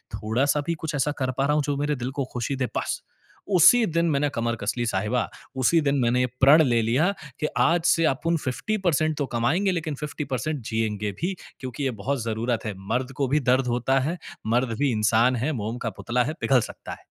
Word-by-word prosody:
थोड़ा-सा 130 +7 +1
भी 170 - +1
कुछ 155 -1 -3
ऐसा 145 +1 +1
कर 130 0 0
पा 135 - +2
रहा 150 - +2
हूँ 150 - +2
जो 145 -1 -1
मेरे 145 +1 0
दिल 125 +1 -4
को - - -1
खुशी 125 +3 -2
दे? 130 -1 -1
बस - - -2 0.5
उसी 230 +7 +7
दिन 170 -1 0
मैंने 145 +1 +1
कमर 115 0 0
कस 100 - 0
ली 120 - 0
साहिबा, 105 +5 -1 0.3
उसी 130 +6 +3
दिन 140 -1 +1
मैंने 120 +1 +2
ये - - +3 0.2
प्रण 145 +4 +8
ले 120 -4 +2
लिया 140 - +2 0.3
कि 150 - +1
आज 170 0 +3
से 165 -2 +4
अपुन 165 +4 -1
50% 155 - -1
तो 145 - 0
कमाएँगे 165 +12 +2
लेकिन 160 -4 -3
50% 145 -1 -4
जिएँगे 105 -2 -1
भी, 185 +3 0 0.3
क्योंकि 130 +2 -5
ये 135 - +1
बहुत 135 -3 -1
ज़रूरत 115 +1 -2
है। 105 - -2 0.2
मर्द 130 +1 -1
को 140 -2 +1
भी 150 +2 +3
दर्द 130 0 +2
होता 125 +3 +1
है, 160 +7 -2 0.3
मर्द 115 0 +1
भी 140 -3 +2
इंसान 115 +3 +3
है, 135 +7 -1
मोम 115 -2 -3
का 115 -2 -3
पुतला 125 +1 +1
है, 155 +5 -3
पिघल 130 -2 +4
सकता - - -11
है। - - -14
135 Hz, 215 wpm, -25 LUFS, 120-150 Hz, 0.5 s, प्रण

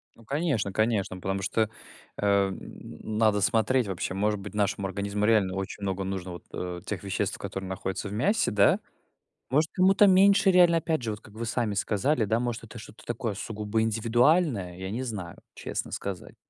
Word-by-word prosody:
Ну 115 - -18
конечно, 135 - -1
конечно, 110 -4 +1
потому 95 +1 -2
что, 110 +3 0 0.5
а, 100 -1 +3
н 105 +2 -8
надо 110 -2 +3
смотреть 115 +3 +2
вообще. 95 -1 -3
Может 105 +1 0
быть, 105 +2 -8
нашему 100 -1 0
организму 100 +1 -2
реально 105 -4 +3
очень 95 +1 -5
много 95 0 -2
нужно 95 -1 -4
вот, 85 - -9
э, 90 -1 -4
тех 100 -2 -4
веществ, 100 - -2
которые 95 -1 -6
находятся 95 +1 -4
в - - -7
мясе, 195 - +1
да? 100 -1 +4 0.7
Может, 155 +4 +2
кому-то 190 +2 +5
меньше 195 +1 +6
реально, 175 -2 +6
опять 160 -3 -1
же, 115 - -3
вот 105 - -6
как 105 - -16
вы 115 +1 -5
сами 115 -2 -1
сказали 110 +6 +1
да, 110 +3 +1
может, 120 -2 -3
это 110 +1 -11
что-то 110 0 -12
такое 115 -2 -3
сугубо 105 +1 -2
индивидуальное, 115 - +2
я 95 +1 -5
не 125 +4 -3
знаю, 105 -8 -6 0.2
честно - - -5
сказать. 95 -4 -6
105 Hz, 180 wpm, -27 LUFS, 95-120 Hz, 0.7 s, меньше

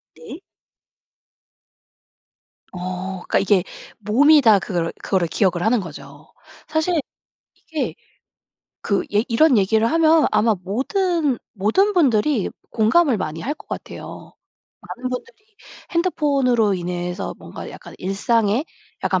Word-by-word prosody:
네. 225 - -10 2.3
어 - - -6 0.5
그러니까 - - +3
이게 195 -2 +3 0.4
몸이 275 +9 +5
다 220 -6 +6
그거를, 175 -3 -2
그거를 185 -4 0
기억을 180 0 +1
하는 225 +3 +2
거죠. 170 -6 -11 0.4
사실 315 +2 +1 0.5
이게 315 -3 -4 0.9
그 200 - 0
얘 210 +2 +3
이런 260 +3 +4
얘기를 220 +3 +2
하면 320 -1 +4
아마 215 +1 +3
모든, 290 - 0 0.2
모든 225 - +2
분들이 260 - +2 0.2
공감을 245 +5 +3
많이 160 -4 -4
할 280 - -3
것 - - -17
같아요. - - -8 0.5
많은 255 +1 -6
분들이 255 - -6 0.5
핸드폰으로 275 - +2
인해서 180 +1 -4
뭔가 - - -9
약간 - - -12
일상에 210 +5 +1 0.4
약간 - - +1
230 Hz, 245 characters per minute, -21 LUFS, 195-300 Hz, 2.3 s, 다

